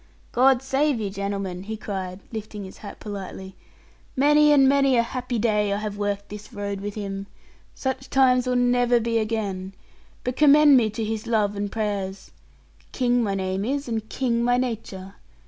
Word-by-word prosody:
'God 260 +1 +4
save 270 0 +1
you, 205 -3 -3
gentlemen,' 200 -2 -4
he 220 +3 -6
cried, 190 -2 -5
lifting 215 -2 -6
his 190 - -12
hat 205 - -9
politely; 190 -2 -7 0.6
'many 295 +2 +5
and 275 -2 +6
many 275 -2 +4
a 235 - +4
happy 245 0 -4
day 210 -2 +1
I 200 - 0
have 210 -1 -4
worked 205 0 -3
this 210 +4 -9
road 200 -2 -4
with 205 0 -5
him. 195 -2 -5 0.5
Such 265 0 -3
times 255 -2 +3
will 250 - +1
never 245 -1 +3
be 230 0 0
again. 200 -4 -3 0.5
But 250 0 -2
commend 295 -1 +7
me 230 -4 +4
to 220 +2 -4
his 220 +1 -3
love 210 -3 +1
and 200 0 -3
prayers. 200 -3 -3 0.6
King 245 -1 +1
my 200 -4 0
name 190 0 -2
is, 275 +4 -2
and 220 -2 -3
King 235 -3 0
my 245 +1 +3
nature. 215 -6 -4
220 Hz, 175 wpm, -24 LUFS, 200-250 Hz, 0.6 s, commend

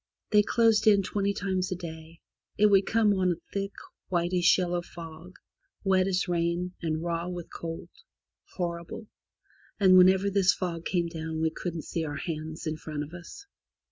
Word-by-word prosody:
They 210 -1 +6
closed 220 0 +3
in 200 -2 +6
twenty 200 +1 0
times 190 -1 -2
a - - 0
day. 160 -2 -9 0.4
It 210 0 +5
would 195 -1 +4
come 220 -2 +3
on 185 -2 +2
a 170 - -15
thick 200 0 -2 0.4
whitish 175 0 +3
yellow 175 -1 0
fog, 170 +1 -11 0.5
wet 190 -1 +3
as 190 0 0
rain, 175 +1 -1
and 160 -1 -2
raw 170 0 -2
with 175 -2 -7
cold 165 -1 -6 0.4
— - - -64
horrible! 170 +3 -4 0.4
— - - -32
and 185 -2 +7
whenever 190 +2 +5
this 190 -2 +4
fog 170 -2 -4
came 175 -2 +1
down 160 -1 -5
we 160 0 +1
couldn't 170 -2 -5
see 165 - -3
our 145 -2 -4
hands 160 +1 -5
in 155 -1 -2
front 150 -1 -5
of 150 +3 -11
us. 175 - -10
175 Hz, 175 wpm, -28 LUFS, 165-190 Hz, 0.5 s, and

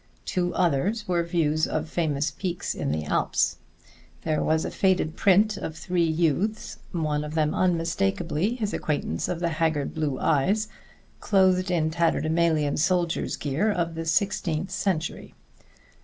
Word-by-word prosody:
Two 175 -1 -1
others 185 +6 +1
were 175 -2 +2
views 160 -2 +1
of 155 +1 -2
famous 155 -3 -1
peaks 175 +2 -3
in - - -2
the 75 0 -1
Alps. - - +1 0.7
There 155 -2 0
was 160 0 +1
a - - -3
faded 185 -5 +1
print 205 +2 +3
of 160 - -5
three 180 0 0
youths 170 +7 0
one 155 -4 -1
of 150 +1 -6
them 155 -1 +1
unmistakably 170 - 0
his 215 -4 -3
acquaintance 145 - -2
of 175 - -3
the 170 -1 0
haggard 155 -3 0
blue 150 -4 -2
eyes 190 +9 +2 0.5
clothed 185 -2 +3
in 160 -3 +1
tatterdemalion 160 -2 +1
soldier's 175 0 +1
gear 155 +10 0
of 170 -4 -1
the 165 0 -5
sixteenth 175 0 0
century. 165 -5 -2
165 Hz, 140 wpm, -26 LUFS, 155-185 Hz, 0.7 s, print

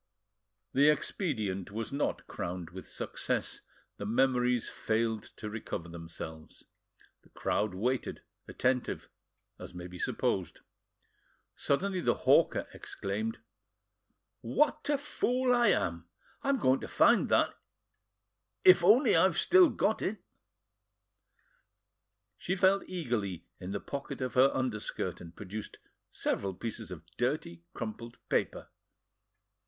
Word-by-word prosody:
The 145 +3 +6
expedient 110 - -1
was 110 +2 -4
not 140 +1 -1
crowned 90 -1 -5
with 95 +1 -9
success, - - -3 0.4
the 100 - -5
memories 125 0 +2
failed 110 0 -1
to 105 - -7
recover 105 -5 -5
themselves. 80 -1 -9 0.6
The - - -24
crowd 105 -3 -1
waited, 125 +6 -1 0.2
attentive, 130 -1 -1 0.5
as - - -9
may 90 0 -6
be 90 0 -9
supposed. 95 -4 -1 0.9
Suddenly 185 +6 0
the - - +2
hawker - - +4
exclaimed: 105 +3 -3 1.0
"What 290 - +1
a 290 - +3
fool 255 -3 +1
I 240 -2 +4
am! 85 - +1 0.3
I - - -2
am 275 - +3
going 130 - +3
to - - -6
find - - +4
that, - - +3 1.1
if 185 -1 +8
only 220 +10 +6
I - - +6
have - - +3
still 365 -2 +6
got 220 - 0
it." 215 - -1 2.2
She 185 - -1
felt 190 +1 +4
eagerly 110 - -2
in 90 - -6
the 100 - -2
pocket 140 +6 -6
of 130 -1 -3
her 130 +2 +6
underskirt, 125 -5 -3
and 85 -1 -11
produced 105 +2 -7 0.3
several 95 -2 -2
pieces 110 0 -5
of 85 -3 -9
dirty, 120 - -1
crumpled 115 +2 -6
paper. - - -1
115 Hz, 120 wpm, -31 LUFS, 95-155 Hz, 2.2 s, if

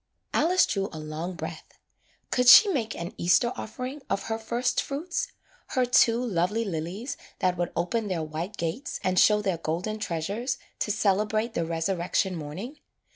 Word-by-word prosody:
" - - -46
Alice 355 +5 +4
drew 195 -1 -1
a 160 - -8
long 155 +4 -5
breath. - - -8 0.5
Could 250 0 +2
she 410 - +10
make 230 - -1
an 170 +1 -5
Easter 180 +8 +3
offering 255 +6 -6
of 195 - -1
her 225 0 -3
firstfruits, 275 - -1 0.5
her 255 - +4
two 235 -1 +4
lovely 210 +2 0
lilies 185 - -4 0.2
that 180 -1 +1
would 175 -1 -2
open 210 +6 -1
their 175 -4 -1
white 160 +6 -5
gates 170 - -3
and 185 0 +2
show 210 -1 +5
their 190 -4 0
golden 175 +7 -2
treasures 205 - -2 0.2
to - - -1
celebrate 215 +2 +1
the 170 - -1
resurrection 175 +2 0
morning? 185 - -7
200 Hz, 160 wpm, -27 LUFS, 170-235 Hz, 0.5 s, she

